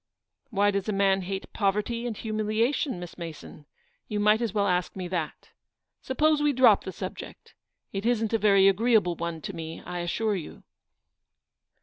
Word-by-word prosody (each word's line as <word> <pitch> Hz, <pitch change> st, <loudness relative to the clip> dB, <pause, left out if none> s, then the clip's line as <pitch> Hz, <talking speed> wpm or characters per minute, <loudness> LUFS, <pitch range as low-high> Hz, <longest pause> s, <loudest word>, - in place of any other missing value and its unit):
""Why 205 Hz, -3 st, +2 dB
does 200 Hz, +1 st, -2 dB
a -, -, 0 dB
man 195 Hz, -1 st, +3 dB
hate 190 Hz, +1 st, -5 dB
poverty 210 Hz, +4 st, 0 dB
and 230 Hz, -, -3 dB
humilia 215 Hz, +4 st, 0 dB
tion, 265 Hz, -, -2 dB
Miss 175 Hz, 0 st, -9 dB
Mason? 155 Hz, -3 st, -9 dB, 0.4 s
You 210 Hz, -, -2 dB
might 210 Hz, +2 st, +4 dB
as 230 Hz, -3 st, -1 dB
well 200 Hz, 0 st, +1 dB
ask 180 Hz, -2 st, 0 dB
me 185 Hz, -2 st, -4 dB
that. 170 Hz, -4 st, -4 dB, 0.5 s
Suppose 300 Hz, +3 st, +2 dB
we 295 Hz, -1 st, +3 dB
drop 245 Hz, -5 st, +5 dB
the 190 Hz, -, -4 dB
subject. -, -, -8 dB, 0.4 s
It 195 Hz, 0 st, -3 dB
isn't 230 Hz, -2 st, +1 dB
a 225 Hz, -, +3 dB
very 195 Hz, -2 st, +5 dB
agreeable 210 Hz, -2 st, +3 dB
one 170 Hz, -1 st, -4 dB
to -, -, -5 dB
me, 160 Hz, 0 st, -6 dB
I 175 Hz, -, -4 dB
assure 205 Hz, +5 st, -1 dB
you." 170 Hz, -5 st, -8 dB
200 Hz, 175 wpm, -27 LUFS, 180-225 Hz, 0.5 s, drop